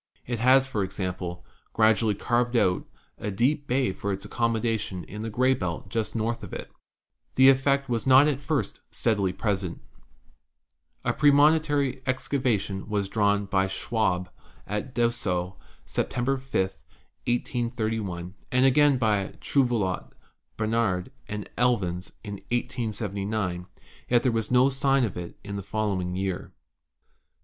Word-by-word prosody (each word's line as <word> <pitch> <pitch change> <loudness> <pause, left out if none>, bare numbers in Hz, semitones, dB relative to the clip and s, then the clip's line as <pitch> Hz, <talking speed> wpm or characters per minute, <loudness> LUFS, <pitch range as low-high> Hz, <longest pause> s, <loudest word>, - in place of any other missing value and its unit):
JUPITER 120 -1 -2
201 - - -9
It 125 +3 +4
has, 135 0 +4
for 110 -7 -1
example, 90 -2 -4 0.3
gradually 110 -1 +3
carved 120 +3 0
out 90 -6 +2 0.3
a 105 - -3
deep 135 +9 +1
bay 125 -5 +1
for 100 +1 -3
its 100 +1 -4
accommodation 115 -4 -1
in 105 +6 -8
the 115 - -3
gray 130 +4 +3
belt 90 -4 -4
just 110 +1 -2
north 115 +1 -1
of - - -9
it. - - -6 0.6
The 130 +1 +8
effect 140 +1 +3
was 120 0 -1
not 135 +3 +7
at 140 -3 0
first 145 +1 -2
steadily 100 -5 +1
present. 95 -3 -2 1.3
A - - +2
premonitory 145 -2 +4
excavation 125 -7 -1
was 100 -2 -1
drawn 100 -1 +2
by 95 -1 +1
Schwabe 95 -2 -1 0.4
at 105 +5 -4
Dessau, 95 -6 0 0.3
September 125 +2 0
5, 135 0 -11 0.8
183 120 -2 -1
1, 90 -3 -5 0.2
and 125 +1 +4
again 140 +1 +5
by 105 -5 0
Trouvelot, 120 -9 0 0.4
Barnard 110 -2 0 0.2
and 105 0 -5
Elvins 95 -8 0
in 100 -2 -5
1879; 105 -6 -2 0.4
yet 120 -1 +4
there 125 - +3
was 115 -1 -1
no 125 +1 +5
sign 135 0 +2
of 110 - -1
it 90 -1 -7
in 100 0 -5
the - - -3
following 95 -3 -2
year. 95 -1 -3
110 Hz, 140 wpm, -26 LUFS, 95-125 Hz, 1.3 s, The